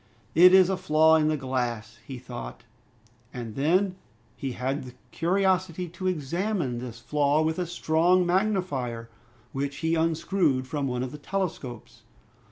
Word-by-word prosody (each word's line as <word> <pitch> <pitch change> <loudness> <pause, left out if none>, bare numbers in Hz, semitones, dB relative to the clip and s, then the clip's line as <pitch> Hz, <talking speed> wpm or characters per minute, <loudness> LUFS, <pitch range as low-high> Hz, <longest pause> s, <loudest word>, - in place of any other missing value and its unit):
"It 180 +3 +8
is 190 -1 +7
a 190 - 0
flaw 160 0 +4
in 155 -1 +2
the 155 0 +1
glass," 120 -4 -3
he 130 +1 -8
thought. 120 - -8 0.7
And 115 -3 -6
then 180 - +1 0.4
he 135 -2 -4
had 130 +4 -2
the 125 -1 -11 0.2
curiosity 185 0 0
to 185 +3 -5
examine 170 - -1
this 120 -2 -7
flaw 145 +3 +1
with 160 +2 -1
a 180 - -1
strong 175 +2 +2
magnifier 175 - -1 0.4
which 140 +1 -3
he 160 - +2
unscrewed 160 -3 +1
from 140 0 -2
one 125 -1 -2
of 130 - -5
the 150 - -9
telescopes. 155 - -5
155 Hz, 150 wpm, -26 LUFS, 130-180 Hz, 0.7 s, It